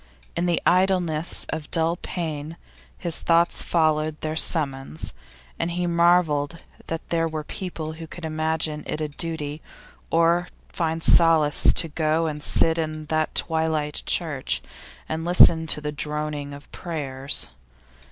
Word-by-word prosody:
In 170 +1 0
the 170 -2 +2
idleness 180 -4 +2
of 150 -2 -5
dull 165 0 +2
pain 160 -3 -5 0.4
his 170 -2 0
thoughts 170 0 +2
followed 155 -2 +1
their 155 0 -2
summons, 135 - 0 0.5
and 165 - 0
he 175 +1 -2
marvelled 170 -3 +2 0.3
that 165 0 -5
there 165 -1 +1
were 155 -1 -4
people 160 -2 -5
who 160 0 -9
could 175 +1 -8
imagine 155 -1 -1
it - - -3
a 155 - -1
duty 150 -1 -4 0.5
or 170 +2 +3 0.3
find 165 -1 -1
it - - +2
a - - +7
solace 160 -3 +5
to 165 - +1
go 155 +1 0
and 150 -2 -3
sit 165 +2 +2
in 155 -1 -3
that 155 0 0
twilight 160 -2 0
church 155 -6 0 0.4
and 160 +1 -3
listen 165 -2 +6
to 150 - +3
the 150 0 -3
droning 150 0 -3
of 140 0 -11
prayers. 140 - -2
160 Hz, 145 wpm, -24 LUFS, 150-170 Hz, 0.5 s, a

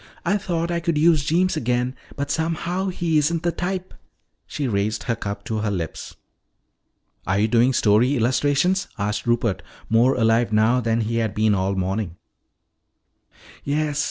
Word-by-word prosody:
I 195 +4 +2
thought 175 -4 -2
I 170 - 0
could 170 -2 -1
use 155 -1 +4
Jeems 175 +5 +1
again, 125 -2 0 0.2
but 140 0 -3
somehow 170 +4 -1
he 170 -4 +1
isn't 165 +2 0
the 170 - +1
type." 185 +2 -4 0.5
She 145 - -3
raised 105 -1 -1
her 115 - -1
cup 100 -2 -5
to 110 -2 -2
her 105 0 -1
lips. 85 -6 -5 1.1
"Are 95 +1 +1
you 105 +2 +2
doing 120 +3 +3
story 120 +3 +3
illustrations?" 145 +10 +1
asked 105 +2 -2
Rupert, 120 -5 +1 0.3
more 120 +4 +4
alive 115 0 +2
now 110 +4 +3
than 115 0 0
he 115 +1 -1
had 110 -3 -1
been 110 0 +3
all 95 0 0
morning. 95 -1 -2 1.5
"Yes. 150 0 -1
125 Hz, 155 wpm, -22 LUFS, 110-160 Hz, 1.5 s, use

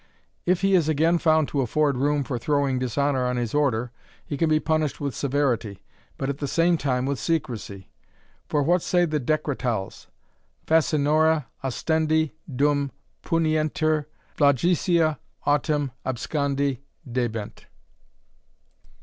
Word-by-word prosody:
If 180 0 +2
he 195 0 +2
is 170 -4 +3
again 160 +3 +2
found 155 -2 +3
to 140 - 0
afford 140 +3 +1
room 145 +2 +1
for 125 -2 -4
throwing 140 -1 +1
dishonour 130 +2 0
on 125 0 -1
his 120 -3 -2
order, 125 -5 +1 0.3
he 145 - -4
can 160 +2 +1
be 155 0 +3
punished 155 -2 0
with 140 -3 -3
severity, 125 -7 -1 0.3
but 135 - -2
at 140 +1 -3
the 145 - -2
same 170 +5 +3
time 130 -5 -1
with 140 -1 -2
secrecy. 120 - -3 0.6
For 145 -1 +1
what 175 +4 +2
say 175 +1 +2
the 155 -2 -1
Decretals! 125 -7 -2 0.6
Facinora 155 -1 +3 0.2
ostendi 160 +3 +1 0.2
dum 140 +1 +1 0.3
punientur, 155 -2 +1 0.3
flagitia 160 +3 +2 0.3
autem 145 -1 +1
abscondi 140 +1 -1 0.3
debent." 120 -4 -4
145 Hz, 125 wpm, -24 LUFS, 130-155 Hz, 0.6 s, is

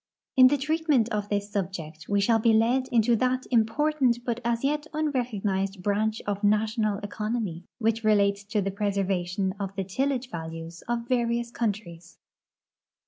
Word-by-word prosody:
In 255 -1 +9
the 290 +3 +2
treatment 300 -4 +1
of 210 -2 -2
this 205 0 -2
subject 170 -5 -4
we 205 0 +2
shall 225 +2 +3
he 225 0 +4
led 240 +4 +3
into 235 0 +3
that 255 +2 0
im 225 -3 +4
portant 285 -2 +1
but 235 -1 -1
as 235 +1 0
yet 295 +2 0
unrecognized 205 -10 -1
branch 215 +2 0
of 205 0 -3
national 215 0 +2
economy 210 -4 -3
which 225 0 0
relates 200 -1 +3
to 205 0 -1
the 195 - -1
preservation 195 -2 -1
of 195 -1 -4
the 195 - -1
tillage 260 +6 -2
values 165 0 -7
of 235 0 -2
various 235 -1 0
countries. 190 -8 -4
215 Hz, 155 wpm, -27 LUFS, 195-240 Hz, -, In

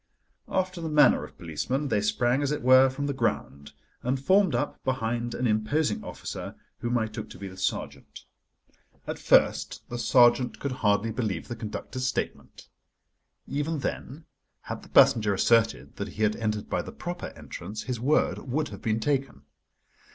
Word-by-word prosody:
After 185 -2 -1
the 160 - -3
manner 150 -1 +5
of - - -11
policemen, 130 - -2
they 105 - +2
sprang, 120 +5 +1
as 140 0 0
it 150 - -2
were, 130 +1 +7
from 140 +2 -4
the 140 - -1
ground, 70 - -2 0.3
and 130 +2 -1
formed 185 +1 +3
up 120 - -2
behind 120 -2 -1
an 125 - -1
imposing 110 +3 +1
officer, - - -7 0.2
whom 120 +1 0
I 110 - +1
took 110 -1 -7
to - - -11
be 100 +1 -7
the 95 - -10
sergeant. 95 - -4 0.8
At - - -5
first - - +2
the 120 - -4
sergeant 120 0 +4
could 140 - -3
hardly 105 -2 +1
believe 105 -7 -3
the 120 - -4
conductor's 115 +3 -4
statement. 130 - -4 0.8
Even 145 +3 -2
then, 145 +2 -5 0.4
had - - -6
the - - -15
passenger 105 -3 +5
asserted 115 +3 +2
that 100 - -3
he 105 +2 -4
had 105 0 +2
entered 110 -2 -2
by - - -1
the - - -8
proper 175 0 -5
entrance, 100 +5 -7
his 125 -3 -3
word 140 +6 +2
would 145 +4 -2
have 100 -2 -9
been 110 0 0
taken. 135 - -1
120 Hz, 170 wpm, -27 LUFS, 110-140 Hz, 0.8 s, were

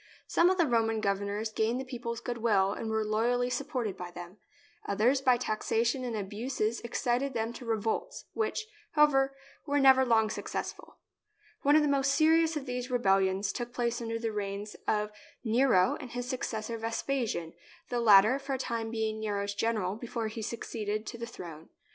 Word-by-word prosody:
Some 345 - +4
of 375 - +1
the 340 - +4
Roman 225 -4 +1
governors 200 +2 -1
gained 220 +3 0
the 265 - -4
people's 235 -3 -5
goodwill 220 -5 +1
and 225 - -4
were 220 0 0
loyally 240 +3 +1
supported 250 -5 -2
by 180 -1 -7
them; 175 +2 -10 0.5
others 235 +7 +2
by 255 -2 +4
taxation 235 +2 0
and 240 -2 -3
abuses 215 +3 -2
excited 245 +2 -1
them 225 +1 -1
to 240 0 -9
re 225 -1 +1
volts, 220 +1 -3
which, 440 0 -1 0.3
however, 275 -3 +4 0.3
were 285 0 +2
never 265 -1 +7
long 220 -3 +3
successful. - - -5 0.6
One 290 +1 +4
of 310 - +6
the - - +2
most 275 -1 +2
serious 320 0 +4
of 280 - -5
these 250 0 -4
rebellions 195 -4 +2
took 240 0 -5
place 240 -1 -1
during 230 -1 -3
the 225 -1 -1
reigns 205 0 -4
of 210 0 +1 0.3
Nero 225 -5 +3
and 255 - -8
his 245 +1 -4
successor, 230 -3 -3
Vespasian, 225 -6 -2 0.4
the 245 - -1
latter 220 +3 +6
for 275 0 -3
a - - -2
time 230 -3 -3
being 220 -1 -2
Nero's 205 -2 -2
gen 225 +3 0
eral 200 0 -2
before 230 -2 -3
he 220 +1 -6
succeeded 215 -1 -3
to 235 - -7
the 235 - -4
throne. 165 -8 -10
230 Hz, 180 wpm, -30 LUFS, 215-255 Hz, 0.6 s, never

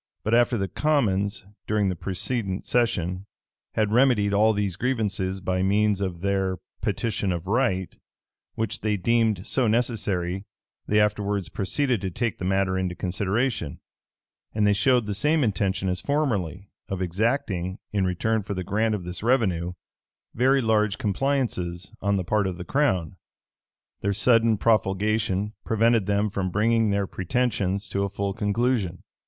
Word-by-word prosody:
But 110 - 0
after 120 0 +4
the 95 -1 -1
commons, 105 -10 0 0.2
during 105 -2 +1
the 95 - -1
precedent 95 +2 -3
session, 95 -5 0 0.5
had 105 -1 +1
remedied 115 -4 +3
all 110 +2 +5
these 100 -4 -1
grievances 100 -5 -1
by 95 0 -1
means 100 +1 +2
of 90 -3 -3
their 95 -1 0 0.2
petition 105 -4 -1
of 85 -1 -3
right, 100 -4 0 0.6
which 110 0 -2
they 105 -1 0
deemed 110 -1 +1
so 130 -3 +1
necessary, 105 -6 0 0.4
they 105 - +3
afterwards 105 -2 0
proceeded 125 +3 0
to 95 - -2
take 115 +5 -2
the 90 - -3
matter 95 0 +1
into 90 -1 -2
consideration, 100 - -1 0.8
and 105 -1 +2
they 105 - +4
showed 125 +3 +3
the 105 - -2
same 150 +9 +2
intention 95 -3 0
as 90 -1 -1
formerly, 100 - -1 0.2
of 95 - -3
exacting, 95 -1 -1 0.2
in 100 -2 +1
return 105 +5 0
for 100 0 -5
the 95 - -3
grant 110 +4 +1
of 100 - -5
this 90 0 -6
revenue, 95 -8 +1 0.6
very 130 +2 +3
large 110 -2 +2
compliances 105 -7 -1
on 100 +1 +1
the 95 - -1
part 100 +2 +1
of 90 -2 -4
the 90 - -7
crown. 95 - 0 0.8
Their 100 0 0
sudden 115 +1 +3
profulgation 105 -1 +1
prevented 115 -2 +2
them 100 0 +1
from 95 -2 -1
bringing 110 +3 +2
their 100 0 +1
pretensions 100 -1 -1
to 100 - -1
a 100 - 0
full 100 0 -2
conclusion. 105 -3 0
100 Hz, 150 wpm, -25 LUFS, 95-115 Hz, 0.8 s, all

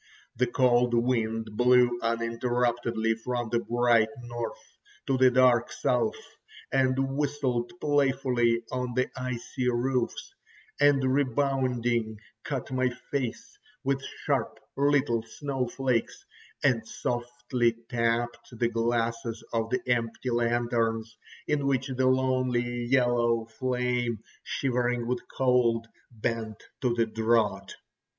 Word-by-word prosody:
The 125 +2 +1
cold 120 -1 +3
wind 115 -2 0
blew 125 +1 +4
uninterruptedly 115 0 0
from 120 -2 -2
the 120 +1 +1
bright 120 -2 +3 0.2
north 120 -1 -7 0.3
to 135 - +1
the 130 0 +6
dark 125 -2 +4
south, 125 -1 0 0.6
and 135 +1 +1
whistled 135 -5 -1
playfully 130 -5 +2
on 125 -1 -3
the 125 0 +1
icy 125 0 -2
roofs, 125 0 -1 0.5
and 145 -1 +4
rebounding 130 -4 +1 0.3
cut 135 -3 -4
my 130 0 +1 0.2
face 140 - -3 0.2
with 135 0 0 0.2
sharp - - 0 0.2
little 140 -4 +2
snow 130 +3 -3
flakes, 125 -2 -1 0.4
and 120 -6 +2
softly 120 0 -1
tapped 120 0 -1
the 120 0 +1
glasses 115 0 -1
of 115 -1 0
the 125 0 0
empty 120 0 -1
lanterns, 115 -1 0 0.3
in 145 -2 0
which 135 0 0
the 130 0 +2
lonely 130 -2 +1
yellow 120 -3 +2
flame, 125 0 -1 0.3
shivering 125 -2 -1
with 125 +1 -1 0.2
cold, 125 -3 +3 0.2
bent 110 -1 -3 0.2
to 125 - +2
the 115 -1 +2
draught. 110 -3 0
120 Hz, 110 wpm, -28 LUFS, 115-130 Hz, 0.6 s, the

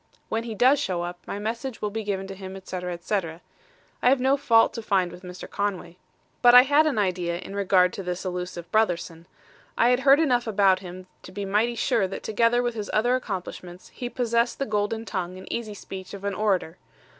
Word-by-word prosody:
When 225 +1 -2
he 225 -2 -5
does 260 +6 +4
show 180 -10 -2
up, 175 0 -6
my - - -4
message 230 +4 -4
will 210 - -2
be 220 +1 -4
given 195 -2 -3
him, 190 -1 -8
etc., 185 -1 -5
etc. 170 -1 -3 0.6
I 245 - +5
have 265 0 +4
no 265 +2 +3
fault 230 -5 +4
to 230 - -5
find 190 -5 +1
with 180 - -11
Mr. 180 -1 -9
Conway. 185 -4 -3 0.4
"But 245 0 +7
I 250 - +11
had 290 +3 +4
an 280 -7 0
idea 180 -4 0
in 190 +2 -8
regard 185 -2 +3
to - - -5
this 180 0 -4
elusive 180 -1 -5
Brotherson. 175 -5 0 0.5
I 235 - +4
had 250 0 +3
heard 275 +2 +6
enough 245 -7 +2
about 195 -3 +3
him 185 0 -9 0.2
to - - -12
be 200 +1 -5
mighty 215 +5 +1
sure 230 -4 +1
that 195 - -7
together 230 +3 +2
with 240 -1 -1
his 210 -2 -5
other 240 +4 +2
accomplishments 185 -5 -6
he 245 - -6
possessed 235 -1 0
the 275 - -1
golden 215 +1 -1
tongue 185 -3 -4
and 190 - -10
easy 220 -3 -4
speech 190 0 -8
of 200 - -11
an 200 0 -1
orator. 190 -4 0
205 Hz, 210 wpm, -25 LUFS, 185-235 Hz, 0.6 s, I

